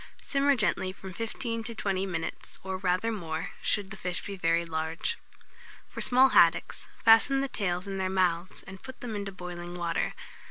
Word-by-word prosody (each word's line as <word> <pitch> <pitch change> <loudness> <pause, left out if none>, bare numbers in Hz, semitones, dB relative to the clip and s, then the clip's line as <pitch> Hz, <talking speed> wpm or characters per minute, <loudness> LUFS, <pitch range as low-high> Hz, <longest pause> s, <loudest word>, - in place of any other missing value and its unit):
Simmer 280 0 +3
gently 210 -5 0
from 190 0 -10
15 230 +2 -3
to 230 0 -4
20 195 -2 -1
minutes, 165 -3 -4
or 190 0 -3
rather 185 +4 +1
more, 165 -7 -4
should 200 -2 0
the - - -5
fish 180 -1 -2
be 200 - -5
very 170 -2 +1
large. 160 0 -2 0.7
For - - -7
small 260 +2 +6
haddocks, - - +4 0.2
fasten 230 +5 +6
the 275 - 0
tails 180 -6 -2
in 195 -1 -4
their 190 0 0
mouths, 185 -2 0
and 190 -1 -11
put 260 -1 -10
them 230 -3 -4
into 200 -1 -3
boiling 175 -2 -7
water. 170 -1 -1
190 Hz, 175 wpm, -29 LUFS, 175-225 Hz, 0.7 s, small